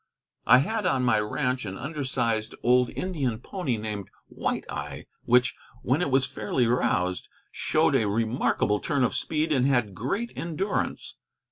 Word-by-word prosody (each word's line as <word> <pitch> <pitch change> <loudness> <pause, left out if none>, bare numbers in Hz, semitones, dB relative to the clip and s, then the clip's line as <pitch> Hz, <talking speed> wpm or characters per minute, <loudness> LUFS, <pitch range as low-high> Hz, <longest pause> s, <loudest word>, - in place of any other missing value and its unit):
I 125 - +9
had 210 - 0
on 130 -7 +1
my 110 -3 +4
ranch 125 +4 -1
an 95 -2 -5
under 145 +2 -4
sized 115 -4 -1
old 125 0 +4
Indian 145 -11 -2
pony 140 - -3
named 105 -3 -5 0.2
White - - -2
Eye, - - -6 0.2
which, 125 +1 +4 0.3
when 135 +7 +1
it 160 - +1
was 135 0 +3
fairly 110 +4 -1
roused, 90 -6 0 0.2
showed - - +1
a 110 - +3
remarkable 110 -1 +1
turn 140 -3 0
of 125 - +1
speed, 155 0 -1
and 130 -3 +3
had 120 -7 +1
great 195 - -3
endurance. 170 +5 -3
125 Hz, 155 wpm, -26 LUFS, 110-145 Hz, 0.3 s, I